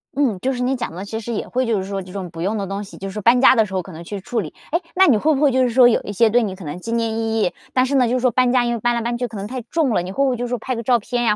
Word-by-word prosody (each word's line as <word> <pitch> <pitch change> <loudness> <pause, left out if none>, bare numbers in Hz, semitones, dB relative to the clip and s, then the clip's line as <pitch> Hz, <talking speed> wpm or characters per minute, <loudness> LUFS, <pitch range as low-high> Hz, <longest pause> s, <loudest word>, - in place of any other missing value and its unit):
嗯， 260 -9 +1
就 265 - 0
是 250 -1 -3
你 260 +2 +1
讲 240 -9 -4
得 190 +3 -6
其 220 +2 -5
实 235 +1 -5
也 210 - -3
会 255 +1 -1
就 230 -2 +1
是 190 - -2
说 195 -1 -3
这 185 0 -11
种 190 -2 -5
不 165 - -8
用 200 +5 -1
的 200 - -2
东 195 +2 -4
西， 200 - -12
就 195 - -6
是 210 +2 -5
搬 235 +4 +5
家 260 - +7
的 220 -3 +4
时 190 - -10
候 185 - 0
可 185 - -11
能 165 0 -9
去 200 +4 -6
处 230 +5 -3
理。 160 -8 -5 0.2
哎， 335 - +2 0.2
那 380 +1 +6
你 280 - +5
会 310 +9 +2
不 270 - -2
会 290 -2 +4
就 260 0 +2
是 250 - +2
说 240 +1 +6
有 235 - +2
一 - - -5
些 220 +3 +3
对 240 +3 +3
你 200 -5 -3
可 185 -3 -11
能 150 +4 -6
纪 230 +5 -6
念 230 -1 0
意 225 0 -1
义， 180 - +1 0.2
但 255 0 +3
是 275 +2 -1
呢， 255 -3 +4
就 240 - 0
是 - - +1
说 255 -1 +3
搬 250 +1 +2
家 250 -1 +3
因 240 - 0
为 235 - -3
搬 240 +2 +1
来 235 - -1
搬 235 +1 -2
去 245 0 -2
可 220 - -9
能 195 - -5
太 250 +4 -5
重 310 +4 0
了， 180 - +2
你 180 +2 -6
会 275 +8 0
不 275 - +3
会 255 - 0
就 245 - -3
是 - - -5
说 245 - -1
拍 255 +3 -4
个 230 - -4
照 245 +1 +3
片 240 +2 -2
呀， 215 -3 +3
230 Hz, 440 characters per minute, -20 LUFS, 200-250 Hz, 0.2 s, 家